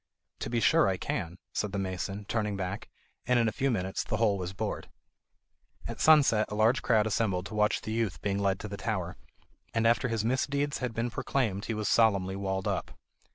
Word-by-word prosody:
"To - - -4
be 120 - 0
sure 100 - +4
I 95 -1 +1
can," 85 0 -3 0.2
said 105 -2 -2
the - - -1
mason, 95 +1 -3
turning 105 -2 -1
back, 95 +2 -4 0.4
and 125 0 +4
in 115 -1 +3
a - - +1
few 135 +1 0
minutes 95 -5 -1
the - - -2
hole 105 -4 +2
was 90 0 -4
bored. 95 - -4 1.0
At - - -6
sunset 140 -9 +5
a - - -3
large 110 +5 +3
crowd 110 -4 +3
assembled 100 -4 0
to 105 - -8
watch 105 0 +2
the 110 - -5
youth 110 -8 -1
being 100 +2 -1
led 95 -1 +1
to 105 - -5
the 100 -1 -6
tower, 95 -6 -3 0.6
and 115 0 +2
after 120 +2 +3
his 115 -2 -1
misdeeds 140 +4 0
had 125 -3 -3
been 115 +1 -1
proclaimed 115 -5 -1
he 115 - -2
was 105 -1 -2
solemnly 100 -4 +3
walled 95 -1 -2
up. - - -3
105 Hz, 205 wpm, -29 LUFS, 95-115 Hz, 1.0 s, sunset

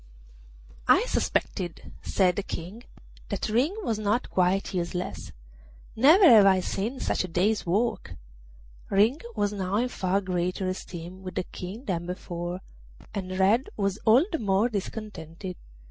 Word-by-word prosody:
'I - - +5
suspected,' 175 -3 -2
said 185 -3 +2
the 200 - -1
King, 195 +5 -7 0.4
'that - - -2
Ring 255 - +2
was 225 - -1
not 215 +4 0
quite 185 +2 +1
useless; 180 0 -3 0.6
never 315 - +7
have 220 -8 +8
I 190 -1 +5
seen 220 +8 -3
such - - 0
a - - -4
day's 185 +4 0
work.' 190 - 0 0.7
Ring 215 +9 +3 0.2
was 205 0 0
now 190 -1 -2
in 245 +4 +1
far 190 -3 0
greater 185 0 -2
esteem 185 0 -6
with 185 -1 -7
the - - 0
King 195 +9 -8
than 175 -3 -2
before, 175 0 -5 0.5
and 185 -2 -4
Red 205 +7 +3
was 200 0 -1
all 240 +8 +5
the 325 - -1
more 200 +3 +2
discontented. 190 -4 -6
195 Hz, 145 wpm, -27 LUFS, 180-220 Hz, 0.7 s, have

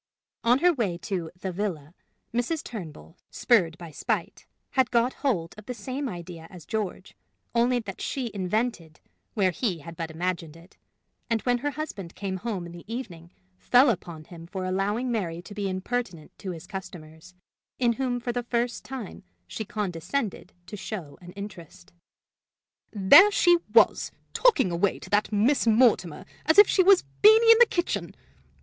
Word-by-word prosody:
On 240 +2 +4
her 355 - +6
way 210 - -1
to 180 -5 -3
"the 190 0 -4
villa," 175 -6 -4 0.4
Mrs. 245 +7 -1
Turnbull, 170 -5 -9
spurred 180 -9 +2
by 170 -3 -10
spite, - - -3 0.2
had 260 -2 +2
got 240 +1 +2
hold 180 - -1
of 215 - -15
the 250 - -4
same 260 +5 -4
idea 170 -3 -8
as 175 -5 -12
George, 210 -4 -4 0.4
only 240 +1 +3
that 205 -5 -6
she 250 -4 -3
invented 190 -4 -2 0.4
where 190 -4 +2
he 180 +1 -2
had 165 +2 -10
but 165 -1 -5
imagined 165 -1 -4
it; 170 +3 -18 0.5
and 225 -2 0
when 245 -1 +1
her 290 +4 -1
husband 270 - -6
came 190 -2 -4
home 195 -3 -4
in 170 - -9
the 175 0 -11
evening 180 -9 -7 0.3
fell 250 - +5
out - - +3
upon 170 -3 -9
him 165 0 -12
for 185 0 -5
allowing 205 +7 -1
Mary 175 -7 -2
to 205 - -11
be 200 -1 -3
impertinent 185 -3 -4
to 195 - -6
his 170 -1 -7
customers, 180 -2 -10 0.4
in 240 -2 +2
whom 250 0 -2
for 240 0 -3
the 245 0 -2
first 240 0 -2
time 260 -7 -7 0.2
she 155 - -5
condescended 205 - -3
to - - -8
show 185 -7 -7
an 175 0 -11
interest: 190 -5 -10 1.0
"There 215 - +8
she 350 -4 +4
was, 225 +1 +4 0.2
talking 445 - +3
away 175 +3 +1
to - - -12
that 205 +1 +2
Miss 235 +5 +2
Mortimer 220 -8 +3 0.2
as 315 - +4
if 410 0 +10
she 380 - +3
was 380 0 +6 0.2
Beenie 445 +2 +8
in 455 - +7
the 485 - +8
kitchen! 345 -1 -2
205 Hz, 170 wpm, -26 LUFS, 175-245 Hz, 1.0 s, if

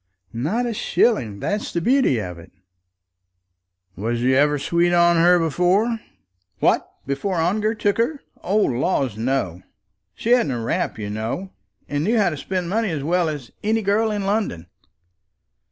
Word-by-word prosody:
"Not 165 - -1
a 235 - -2
shilling. 125 - +1
That's 205 +1 -2
the 170 - -1
beauty 250 - +3
of 90 -4 -6
it." 85 - -14 1.4
"Was 115 +4 -2
you 130 +1 +3
ever 145 +2 +3
sweet 170 +4 +1
on 170 0 +5
her 175 +2 +5
before?" 180 +8 +1 0.6
"What! - - +1
before 140 +8 -2
Ongar 210 +7 +1
took 205 0 0
her? 280 +6 0 0.2
O 195 +4 0
laws, 130 - +1
no. 110 -7 -1 0.5
She 230 - -2
hadn't 240 - +4
a 120 - -3
rap, 115 - -2
you 105 -1 -5
know; 115 - -4 0.4
and 145 +1 -1
knew 225 +7 +2
how 200 -5 +3
to 155 - -5
spend 180 +4 -3
money 215 +3 0
as 155 -5 -3
well 170 +2 +1
as 145 -6 -6
any 220 +1 +1
girl 210 +3 +2
in 205 -2 -2
London." 200 - -1
175 Hz, 160 wpm, -22 LUFS, 130-210 Hz, 1.4 s, on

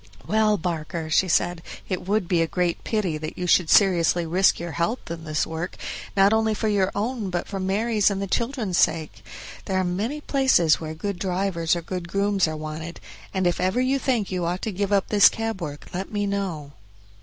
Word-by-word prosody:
"Well, 215 -1 +2
Barker," 160 -2 -4
she 185 - +3
said, 175 0 +1 0.3
"it 185 -1 -4
would 205 -2 +1
be 170 -2 +2
a 165 - +1
great 175 0 -1
pity 190 -8 -1
that 155 0 -6
you 180 - -3
should 175 -1 +3
seriously 175 -3 +4
risk 185 +4 +3
your 170 0 -5
health 170 - -2
in 165 -1 -6
this 155 -1 0
work, 165 +3 -5 0.4
not 195 +2 +5
only 220 -1 +2
for 220 - -1
your 195 -2 +2
own 215 0 -2
but 175 -1 -3
for 195 - -4
Mary's 210 +3 +1
and 200 -1 -2
the 200 - -2
children's 230 -2 -1
sake; 155 -9 0 0.4
there 190 - -1
are 185 - +2
many 205 +11 -2
places 265 - +3
where 160 -1 -6
good 195 +3 -4
drivers 180 -3 0
or 170 - -4
good 180 0 -5
grooms 200 0 +1
are 155 0 -4
wanted, 155 +2 -6 0.3
and 190 -1 -1
if 175 0 +1
ever 185 +6 +1
you 260 +2 +1
think 240 -8 0
you 180 -1 -1
ought 175 +2 -2
to 220 - -1
give 200 +1 -2
up 200 -2 +2
this 205 -4 +7
cab 225 -3 -4
work 145 -3 -6
let 190 +2 -4
me 205 -1 -1
know." 190 -8 -3
185 Hz, 210 wpm, -24 LUFS, 170-205 Hz, 0.4 s, this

